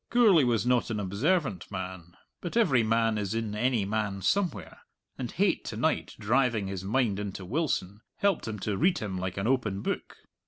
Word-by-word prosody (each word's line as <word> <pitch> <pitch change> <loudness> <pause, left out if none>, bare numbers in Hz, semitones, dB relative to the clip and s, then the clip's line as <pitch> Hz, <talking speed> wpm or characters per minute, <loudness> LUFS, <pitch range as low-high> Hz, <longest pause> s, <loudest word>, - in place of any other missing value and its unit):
Gourlay 215 - +5
was 120 -2 +1
not 125 -1 +2
an 110 -2 -2
observant 110 - 0
man, 95 -3 -7 0.2
but 175 +5 -3
every 140 - +4
man 115 -1 +2
is 100 +1 -2
in 115 -2 -2
any 115 -1 +1
man 100 -2 -2
somewhere, 155 - -1 0.4
and - - -5
hate - - +1
to - - -5
night - - 0
driving 120 -1 +2
his 95 -1 -4
mind 105 -1 +1
into 100 -2 -5
Wilson, 105 - -1
helped 200 -10 +1
him 110 -1 -3
to 105 -1 -1
read 180 +4 +3
him 95 -3 -3
like 95 0 -4
an 95 - -1
open 110 -6 0
book. - - -3
110 Hz, 185 wpm, -28 LUFS, 100-130 Hz, 0.4 s, Gourlay